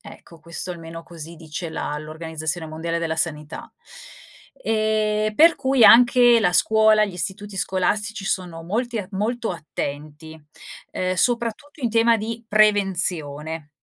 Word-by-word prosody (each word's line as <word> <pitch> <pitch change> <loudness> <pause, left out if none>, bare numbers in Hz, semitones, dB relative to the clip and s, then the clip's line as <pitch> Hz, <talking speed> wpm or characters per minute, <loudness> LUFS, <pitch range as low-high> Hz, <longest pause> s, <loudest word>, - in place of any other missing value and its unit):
Ecco 205 -6 -14
questo 170 +3 -4
almeno 165 -1 -8
così 165 -1 -10
dice 165 +2 -6
la 150 -2 -4
l'Organizzazione 160 +1 -4
Mondiale 165 +2 -4
della 160 -1 -2
Sanità. 155 -1 -3 0.9
Ehm, 215 -1 0
per 330 +5 +6
cui 265 -3 +3
anche 240 0 +7
la 180 -4 +2
scuola, 220 +2 +4
gli 200 - -6
istituti 195 +3 -4
scolastici 205 +3 -1
sono 180 -4 -3
molti 230 +6 -2
a 185 - -5
molto 225 +4 -2
attenti, 155 -1 -7 0.5
ehm, 185 0 -2
soprattutto 245 - -1
in 235 - 0
tema 230 +1 +4
di 230 +2 -6
prevenzione. 175 -8 0
190 Hz, 130 wpm, -22 LUFS, 160-220 Hz, 0.9 s, anche